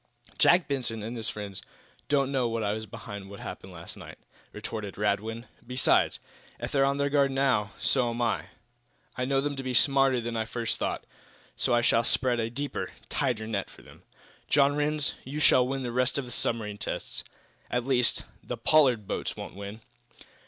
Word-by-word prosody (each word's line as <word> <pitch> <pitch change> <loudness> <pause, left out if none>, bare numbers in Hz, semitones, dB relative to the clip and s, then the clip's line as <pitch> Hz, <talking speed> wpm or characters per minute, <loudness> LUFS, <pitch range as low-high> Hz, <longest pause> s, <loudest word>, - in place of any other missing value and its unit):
"Jack 175 0 +6
Benson 120 -6 -2
and 115 +3 -4
his 115 -1 -1
friends 100 -2 -6 0.5
don't 140 -2 +2
know 125 -4 +1
that 115 - -1
I 105 - +1
was 110 0 -5
behind 100 -1 -8
what 100 - -9
happened - - -7
last - - -8
night," - - -10 0.3
retorted 105 -3 -6
Radwin. 105 +3 -1 0.2
"Besides, 125 +1 +3 0.4
if - - -4
they're 135 -1 +3
on 140 +1 +2
their 140 0 +1
guard, 140 -1 +4
now, 130 -6 +1
so 125 -3 +2
am 115 0 -4
I. 115 -2 +1 0.7
I 125 - -1
know 135 +1 +2
them 145 0 -2
to - - -2
be 130 -1 -2
smarter 135 0 +5
than 120 0 -3
I 110 -1 0
first 115 0 -2
thought, - - -1 0.5
so 120 - +2
I 120 - +4
shall 115 0 +4
spread 125 0 +2
a 115 0 0
deeper, 140 +4 -3 0.2
tighter 120 -6 0
net 105 -3 -2
for - - -16
them. - - -16 0.5
John 145 0 +4
Rhinds, 150 0 +1
you 140 +4 -5
shall 125 -4 +5
win 135 0 -2
the 120 - -3
rest 125 +2 +1
of 140 - -1
the 120 - -10
submarine 105 -3 0
tests. - - -3 0.5
At 125 0 0
least, 125 -3 +3 0.2
the - - -4
Pollard 130 -9 +4
boats - - -3
won't - - -7
win!" 100 +3 -7
125 Hz, 190 wpm, -28 LUFS, 110-135 Hz, 0.7 s, Jack